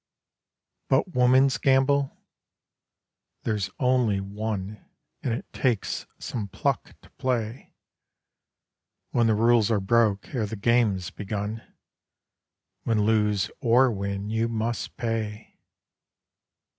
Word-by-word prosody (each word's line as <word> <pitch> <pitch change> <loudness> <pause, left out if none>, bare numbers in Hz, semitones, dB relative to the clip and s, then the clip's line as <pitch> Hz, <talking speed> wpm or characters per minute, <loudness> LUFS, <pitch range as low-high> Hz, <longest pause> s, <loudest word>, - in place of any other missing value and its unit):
But 140 +7 +2
woman's 130 +2 +4
gamble 135 +1 +2 1.3
(there's 105 -4 -1
only 125 -6 +2
one: 100 0 -4 0.4
And 125 - -1
it 115 - -3
takes 120 -6 -1
some 110 -4 -4
pluck - - -2
to - - -19
play, 120 -2 -2 1.4
When 120 -1 +3
the 110 - +3
rules 115 0 +4
are 110 -3 +2
broke 105 0 +1
ere 115 -5 -1
the 110 - -5
game's 105 -4 +1
begun; 105 +2 -4 1.2
When, 110 -3 +1
lose 105 -2 +2
or 125 +2 +4
win, 100 0 -3
you 115 +1 +1
must 115 0 -3
pay!) 110 -2 -4
110 Hz, 105 wpm, -26 LUFS, 105-120 Hz, 1.4 s, woman's